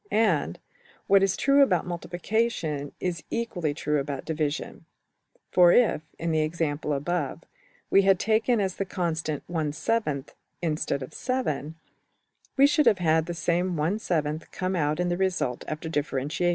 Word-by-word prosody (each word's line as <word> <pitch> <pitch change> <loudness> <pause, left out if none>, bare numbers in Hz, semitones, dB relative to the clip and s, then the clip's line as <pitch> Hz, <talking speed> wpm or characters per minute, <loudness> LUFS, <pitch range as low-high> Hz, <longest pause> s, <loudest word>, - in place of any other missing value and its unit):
And, 170 - +1 0.5
what 195 0 +5
is 195 -1 +2
true 280 +1 +4
about 185 - +3
multiplication 175 -4 -2
is 175 -3 -2
equally 180 -10 -2
true 150 0 -1
about 140 -1 -4
\emph{division}: 155 -2 -3 0.7
for 175 -1 +6
if, 235 -8 +4 0.2
in 165 0 -2
the 155 -1 +2
example 155 -1 -1
above, 150 +1 -2 0.5
we 195 - +6
had 195 -1 +4
taken 220 +4 +2
as 190 -2 -1
the 195 - -1
constant~$\frac$ 160 -1 -2 0.3
instead 155 -4 -1
of~$7$, 155 - -3 0.8
we 275 - +7
should 295 -1 +3
have 215 -4 +5
had 160 -2 +2
the 175 - -4
same~$\frac$ 170 -2 -1
come 185 0 -2
out 150 -1 0
in 180 0 +1
the 175 - 0
result 180 -10 -1
after 155 +1 -4
differentiation. 150 +2 -1
170 Hz, 140 wpm, -26 LUFS, 150-190 Hz, 0.8 s, we